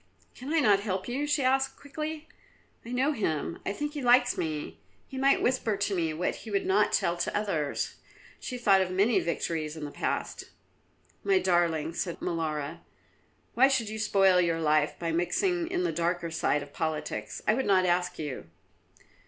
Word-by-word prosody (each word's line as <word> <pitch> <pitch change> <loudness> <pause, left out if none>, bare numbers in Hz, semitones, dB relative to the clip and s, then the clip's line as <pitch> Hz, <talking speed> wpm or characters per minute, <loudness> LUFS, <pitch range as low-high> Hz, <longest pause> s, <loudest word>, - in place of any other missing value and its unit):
"Can 265 +4 -7
I 325 - +3
not 205 -6 +5
help 190 -2 -3
you?" 275 +4 -2
she 295 -1 +1
asked 265 +1 +1
quickly. 305 +2 -6 0.6
"I 230 - -10
know 260 +4 +2
him; 165 - -2
I - - +1
think 295 +7 -4
he 295 - -4
likes 245 0 +4
me. 155 -2 -4 0.3
He 270 - -10
might 275 +1 +3
whisper 240 -5 +1
to 200 0 -1
me 165 -3 0
what 165 +3 -2
he 225 - -10
would 200 -2 0
not 205 +2 +3
tell 170 - +1
to 175 - -1
others." 165 -9 -2 0.4
She 250 - -5
thought 200 -5 +4
of 185 - 0
many 200 +5 +3
victories 165 -2 -2
in 155 - -5
the 145 - -7
past. - - -3 0.8
"My 390 -1 +3
darling," 170 - +1
said 170 0 -3
Molara, 160 -2 -3 0.7
"why 260 +3 +6
should 260 -6 0
you 220 0 -5
spoil 195 -4 +4
your 165 -2 0
life 155 -1 +2
by 170 -1 -2
mixing 335 - 0
in 360 -1 -1
the 355 - 0
darker 170 0 -1
side 150 -2 0
of 145 - -14
politics? 150 -9 -3
I 215 - +5
would 265 +3 -1
not 190 -2 +4
ask 180 0 0
you." 145 - -6
195 Hz, 185 wpm, -28 LUFS, 165-255 Hz, 0.8 s, why